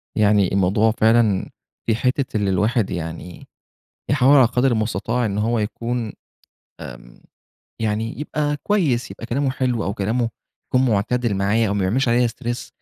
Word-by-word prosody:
يعني 105 -3 +3
الموضوع 100 +3 +2
فعلًا 110 -3 +2 0.4
في 115 - +1
حِتّة 125 -1 -1
اللي 100 -2 0
الواحد 105 +3 +1
يعني 85 0 -6 0.6
يحاول 140 0 +5
على 130 -3 +7
قدر 125 +1 +1
المستطاع 115 +2 -1
إن 100 -1 -2
هو 115 +2 +1
يكون، 115 +1 -3 0.7
آمم، - - -11 0.6
يعني 110 +4 -2
يبقي 150 -1 -2
كويس 160 - 0
يبقي 115 - -8
كلامه 135 +3 0
حلو 125 -4 -1
أو 100 - -2
كلامه 115 +4 -1 0.4
يكون 130 -1 +2
معتدل 110 +2 0
معايا 100 +3 +1
أو 100 - -1
ما 100 - -1
بيعملش 115 +8 +1
عليّا 120 +1 +3
Stress، 120 +1 -5
115 Hz, 150 wpm, -21 LUFS, 105-125 Hz, 0.7 s, على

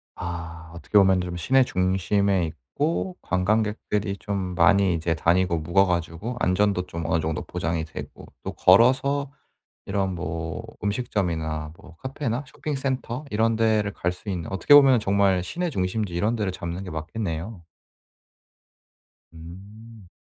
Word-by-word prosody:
아 85 -2 -7
어떻게 85 +5 0
보면 95 -2 +5
좀 90 0 -5
시내 130 +10 +4
중심에 95 -1 +1
있고 145 - -3
관광객들이 105 +1 0
좀 95 -3 -3
많이 100 -1 +4
이제 85 0 0
다니고 85 +1 +2
묵어 85 +5 +3
가지고 85 +6 -2
안전도 90 -1 +1
좀 85 -1 -5
어느 80 -1 +1
정도 80 0 -2
보장이 85 -2 -3
되고 - - -9 0.2
또 - - -4
걸어서 130 +7 +4 0.6
이런 95 -1 -1
뭐 80 -1 -4 0.2
음식점이나 85 -8 -2
뭐 85 - -16
카페나 130 - -3
쇼핑센터 135 -2 -3
이런 110 +1 +2
데를 110 -2 +2
갈 90 +1 -1
수 90 +4 -13
있는 90 -5 -3
어떻게 95 +9 +4
보면 135 -4 +7
정말 100 -3 +2
시내 175 - -3
중심지 95 - -2
이런 105 +7 +1
데를 100 -4 -1
잡는 85 +1 -5
게 90 - -7
맞겠네요. 85 +3 -5 1.7
음. 100 +5 -12
95 Hz, 290 characters per minute, -25 LUFS, 85-110 Hz, 1.7 s, 보면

